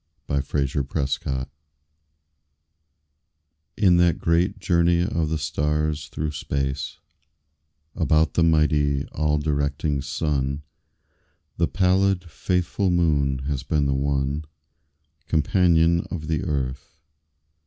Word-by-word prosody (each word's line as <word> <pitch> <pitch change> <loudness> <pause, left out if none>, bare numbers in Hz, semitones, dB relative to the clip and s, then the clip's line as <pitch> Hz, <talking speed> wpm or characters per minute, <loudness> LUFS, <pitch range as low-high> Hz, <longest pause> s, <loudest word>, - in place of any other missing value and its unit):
A 70 -1 0
SOLAR 70 +1 -1 0.2
ECLIPSE 70 0 -1 2.6
In 95 -4 +5
that 85 -1 +3
great 85 +5 +1
journey 85 -2 +2
of 85 -4 0
the 80 - 0
stars 75 +1 -1
through 75 -2 -3
space 70 -1 -3 1.0
About 80 -2 +2
the - - +2
mighty, 75 -3 +2
all 75 0 0
directing 70 -1 -1
Sun, 70 0 -2 0.9
The 85 - +2
pallid, 95 0 +2
faithful 90 +3 0
Moon 70 -6 +1
has 70 -2 -2
been 75 0 0
the 70 - +1
one 70 +2 -1 0.8
Companion 85 +1 +3
of 80 -4 -5
the 80 -1 -1
Earth. 70 -5 -3
75 Hz, 100 wpm, -24 LUFS, 70-85 Hz, 2.6 s, In